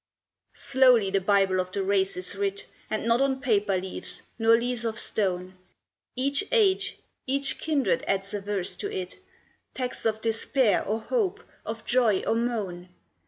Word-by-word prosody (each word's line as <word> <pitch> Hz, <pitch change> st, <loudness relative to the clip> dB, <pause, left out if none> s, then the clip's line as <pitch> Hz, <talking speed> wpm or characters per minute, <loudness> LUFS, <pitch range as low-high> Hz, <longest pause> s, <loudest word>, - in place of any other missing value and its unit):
Slowly 250 Hz, -7 st, +4 dB
the 195 Hz, 0 st, +1 dB
Bible 195 Hz, -1 st, +2 dB
of 185 Hz, 0 st, -2 dB
the 195 Hz, +1 st, -2 dB
race 190 Hz, -1 st, +1 dB
is 180 Hz, 0 st, -3 dB
writ, 400 Hz, 0 st, -2 dB, 0.2 s
And 215 Hz, 0 st, -2 dB
not 230 Hz, +2 st, +3 dB
on 270 Hz, -1 st, +1 dB
paper 210 Hz, -7 st, +1 dB
leaves 185 Hz, 0 st, -4 dB, 0.2 s
nor 225 Hz, 0 st, +5 dB
leaves 240 Hz, 0 st, 0 dB
of 225 Hz, -1 st, -2 dB
stone; 185 Hz, -2 st, -1 dB, 0.6 s
Each 275 Hz, +7 st, +1 dB
age, 420 Hz, -6 st, +2 dB, 0.3 s
each 275 Hz, +1 st, 0 dB
kindred 280 Hz, -10 st, 0 dB
adds 195 Hz, +1 st, -1 dB
a 205 Hz, -, -3 dB
verse 200 Hz, -2 st, -3 dB
to -, -, -4 dB
it, 185 Hz, -, -6 dB, 0.6 s
Texts 250 Hz, -3 st, -2 dB
of 220 Hz, -1 st, -1 dB
despair 225 Hz, +1 st, +1 dB
or 220 Hz, +3 st, -2 dB
hope, 425 Hz, -, -1 dB, 0.2 s
of 225 Hz, 0 st, -5 dB
joy 235 Hz, -6 st, +2 dB
or -, -, +2 dB
moan. 210 Hz, -7 st, -2 dB
225 Hz, 160 wpm, -26 LUFS, 195-260 Hz, 0.6 s, nor